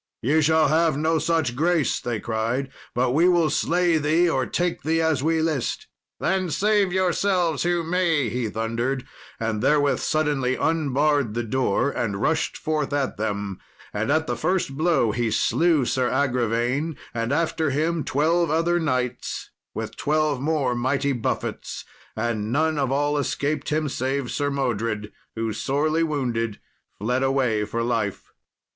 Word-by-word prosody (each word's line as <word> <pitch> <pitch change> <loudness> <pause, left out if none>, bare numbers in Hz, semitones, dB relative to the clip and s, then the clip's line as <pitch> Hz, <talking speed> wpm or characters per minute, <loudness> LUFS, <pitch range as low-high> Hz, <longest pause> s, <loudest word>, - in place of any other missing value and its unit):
"Ye 150 +7 +3
shall 160 0 +4
have 160 -1 +2
no 160 +1 +1
such 160 -6 0
grace," 165 +1 +1
they 120 -3 -3
cried; 115 +5 -2 0.2
"but 125 +1 +2
we 165 +7 +4
will 170 -3 +3
slay 175 -1 +2
thee, 160 +4 +3
or 130 -6 0
take 175 0 -1
thee 160 +1 +1
as 160 -4 +1
we 160 +2 +1
list." 155 -6 -1 0.3
"Then 190 -2 0
save 205 +2 +2
yourselves 185 -2 +1
who 175 -1 +1
may," 165 -5 +1
he 115 0 -2
thundered, 115 +4 -2 0.3
and 110 -2 -1
therewith 145 +1 +3
suddenly 145 -5 0
unbarred 145 -6 +1
the 120 - -1
door 130 +2 +1
and 100 -7 -2
rushed 160 +8 0
forth 155 -2 -1
at 140 -2 -1
them. 100 -2 -3 0.3
And 105 +6 -1
at 160 +1 +2
the 120 - -2
first 170 +2 -1
blow 155 -7 +2
he 115 +1 0
slew 160 +5 +2
Sir 125 0 +1
Agravaine, 125 +3 0 0.2
and 115 +1 -2
after 160 0 +1
him 155 +3 0
twelve 165 +4 +1
other 165 +3 +2
knights, 125 -6 -2 0.2
with - - -5
twelve 150 -2 +1
more 145 -4 +1
mighty 135 +3 0
buffets. 120 -4 -3 0.3
And 110 -1 -2
none 155 +3 +1
of 135 -2 0
all 145 +1 +1
escaped 145 0 -1
him 155 0 0
save 130 -1 -2
Sir 145 -1 0
Modred, 115 -6 -2 0.2
who, 115 -1 -2
sorely 155 +6 0
wounded, 120 -9 -1 0.4
fled 125 +5 0
away 130 -6 +1
for 115 +2 -2
life. 115 -4 -2
140 Hz, 150 wpm, -24 LUFS, 120-160 Hz, 0.4 s, shall